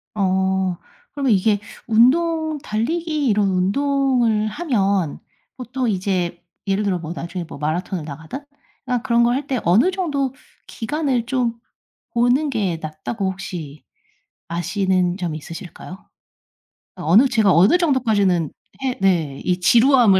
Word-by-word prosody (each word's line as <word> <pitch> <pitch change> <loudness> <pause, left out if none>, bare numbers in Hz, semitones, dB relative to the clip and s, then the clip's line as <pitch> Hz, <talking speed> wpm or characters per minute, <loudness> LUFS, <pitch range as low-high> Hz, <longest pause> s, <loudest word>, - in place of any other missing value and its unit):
어. 190 -2 +1 0.4
그러면 275 -6 +2
이게 205 +1 +2 0.3
운동 315 +7 +3
달리기 300 +6 -1
이런 205 -2 +2
운동을 235 +2 +1
하면 200 - 0 0.4
보통 250 0 -2
이제 185 -3 -1 0.3
예를 195 +2 +1
들어 185 -3 0
뭐 165 -1 -6
나중에 170 +1 -5
뭐 - - -9
마라톤을 160 +3 -2
나가든 160 - -8 0.4
그냥 250 -2 -1
그런 235 0 +3
걸 240 +1 +3
할 280 +1 -2
때 260 -3 -1
어느 215 - +4
정도 290 -8 -1 0.3
기간을 265 -1 -1
좀 245 -2 0 0.6
보는 245 +5 +2
게 200 -9 -1
낫다고 190 +6 -3
혹시 170 -6 -7 0.7
아시는 185 +1 0
점 175 -4 -3
있으실까요? 175 +4 -9 0.9
어느 185 - +4
제가 220 -6 +3
어느 190 - +5
정도까지는 215 - +2 0.3
해 260 -2 -1
네 165 -8 +1
이 180 0 +1
지루함을 235 0 +5
210 Hz, 260 characters per minute, -21 LUFS, 180-260 Hz, 0.9 s, 어느